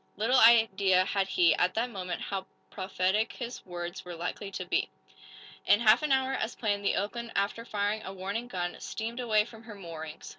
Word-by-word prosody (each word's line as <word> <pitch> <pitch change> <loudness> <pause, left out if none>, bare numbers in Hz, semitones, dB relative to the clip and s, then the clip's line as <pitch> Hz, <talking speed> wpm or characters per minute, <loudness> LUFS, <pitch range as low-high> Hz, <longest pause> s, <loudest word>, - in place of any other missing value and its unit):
Little 245 +5 +3
idea 200 -5 +5
had 195 0 0
he, 175 -3 +4
at 180 +1 +1
that 240 +2 0
moment, 180 -4 -4
how 195 -1 -4 0.2
prophetic 190 +2 0
his 240 0 -7
words 175 +1 -6
were 175 -1 -7
likely 180 +4 -4
to 185 -1 -5
be! 175 - 0 0.8
In 205 - +6
half 220 +2 +5
an 305 -2 -1
hour, 265 0 +2
as 240 -3 -2
planned, 205 -3 -1
the 200 - +2
"Oakland," 230 +3 -3
after 200 +3 0
firing 210 -1 -1
a - - -6
warning 200 +5 -4
gun, 175 -6 -3
steamed 230 +2 -5
away 215 -4 +2
from 225 -1 -13
her 225 -2 -10
moorings. 160 -5 -8
205 Hz, 190 wpm, -29 LUFS, 185-230 Hz, 0.8 s, In